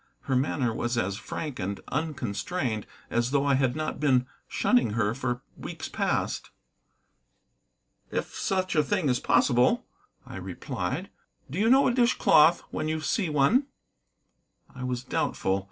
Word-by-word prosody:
Her 135 - -1
manner 130 -2 +1
was 120 +2 -2
as 100 -3 0
frank 145 +2 -5
and 100 +1 -3
unconstrained 130 - -2 0.2
as 120 +1 +1
though 140 +1 +1
I 140 - +3
had 130 -1 +2
not 155 0 -3
been 130 -4 +3 0.2
shunning 245 - +2
her 105 -1 +1
for 125 -1 -3
weeks - - -7
past. - - -1 1.6
"If - - -3
such 185 -2 -1
a 155 - +5
thing 185 -3 0
is 125 - +2
possible," 125 - +3 0.4
I - - -8
replied. - - -4 0.4
"Do - - -3
you 220 +2 +3
know 265 +2 +6
a 250 - +2
dish 240 -1 +3
cloth 160 +3 +6
when - - -2
you 155 0 -1
see 170 +4 0
one?" 155 - +3 1.1
I 130 -2 -7
was 125 -1 -2
doubtful. 95 -5 0
135 Hz, 150 wpm, -27 LUFS, 120-165 Hz, 1.6 s, know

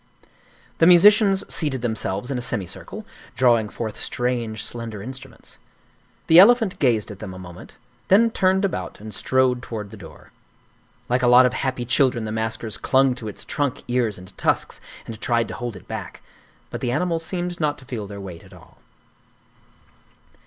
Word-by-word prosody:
The 165 - +6
musicians 195 +2 +6
seated 135 -6 -1
themselves 110 0 -2
in 130 - -1
a - - -4
semicircle, 105 -7 -5 0.3
drawing 120 -4 +3
forth 110 -1 -6
strange, 120 -3 -2
slender 115 -4 -7
instruments. 130 +3 -10 0.7
The 165 +1 +7
elephant 220 -1 +5
gazed 115 -6 +1
at 100 - -10
them 95 -4 -7
a - - -9
moment, 90 -1 -12 0.3
then 225 +4 +5
turned 190 -1 +2
about 195 - -4
and 110 0 -9
strode 130 +3 +1
toward 110 -4 -7
the - - -10
door. - - -14 0.8
Like 125 +1 +1
a 125 - +3
lot 125 +1 +7
of 125 - +1
happy 130 -2 -2
children 125 -2 +2
the 110 - -4
maskers 110 0 -3
clung 135 -1 +3
to 125 -3 -8
its 105 - -7
trunk, 145 -4 -2
ears, 120 -4 0
and 90 0 -13
tusks - - -1 0.2
and 110 -1 -9
tried 115 -1 +1
to - - -5
hold 120 -3 -5
it 95 - -13
back; - - -7 0.5
but - - -5
the 120 - -1
animal 165 +4 0
seemed 175 +1 -4
not 150 -2 0
to 130 - -14
feel 110 -5 -5
their 100 0 -8
weight 90 -4 -9
at 95 0 -17
all. 90 - -18
125 Hz, 175 wpm, -22 LUFS, 110-145 Hz, 0.8 s, The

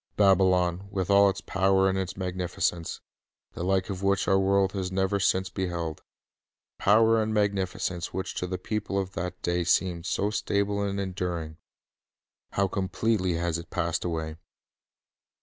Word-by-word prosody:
Babylon, 95 -2 +3
with 100 -1 -2
all 100 0 +7
its 95 - -4
power 95 0 +2
and 95 - +1
its 95 -1 -3
magnificence, 90 -2 -2 0.5
the - - -5
like 95 +1 +1
of 95 -1 -5
which 100 0 +1
our 95 - +4
world 95 0 +3
has 95 -2 -3
never 95 +1 +1
since 95 -1 +1
beheld, 85 -4 -3 0.4
— - - -67
power 110 +2 +5
and 110 0 -1
magnificence 95 -4 -1
which 95 - -4
to 90 - -3
the 90 0 -3
people 100 +1 -3
of 95 -1 -1
that 90 0 -4
day 85 0 +1
seemed 85 0 +1
so 105 +1 0
stable 100 -1 0
and 100 0 -1
enduring, 90 -5 -3 0.5
— - - -67
how 100 0 +2
completely 95 0 0
has 85 0 -1
it 85 - -10
passed 85 -2 -1
away! 80 -2 -3
95 Hz, 160 wpm, -27 LUFS, 90-100 Hz, 0.5 s, all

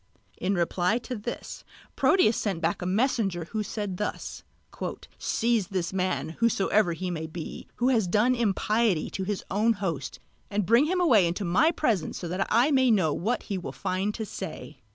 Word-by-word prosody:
In 195 +2 0
reply 175 +4 +1
to 250 +1 -5
this 225 +2 -6 0.3
Proteus 360 - +4
sent 195 -6 -1
back 170 +4 -1
a 180 - -2
messenger 195 -4 +1
who 220 - -1
said 205 -3 -4
thus: 210 - -4 0.8
"Seize 230 -4 +1
this 185 -2 -2
man, 185 -3 -1
whosoever 210 -4 +2
he 180 +2 -4
may 160 -2 -4
be, 160 0 -7
who 245 +2 +2
has 225 -7 +2
done 215 +8 +3
impiety 215 -4 +1
to 190 - -3
his 205 0 -2
own 220 +4 +3
host, 170 -10 -4 0.3
and 205 -1 0
bring 235 - +5
him 365 +3 0
away 230 - +5
into 180 +4 -2
my 190 - +4
presence 235 - 0
that 180 +2 -2
I 240 +7 +4
may 260 -2 +4
know 185 -9 +3
what 230 +6 -1
he 195 -2 -3
will 180 - -6
find 190 +3 -1
to 220 - -4
say." - - -7
205 Hz, 175 wpm, -27 LUFS, 180-230 Hz, 0.8 s, bring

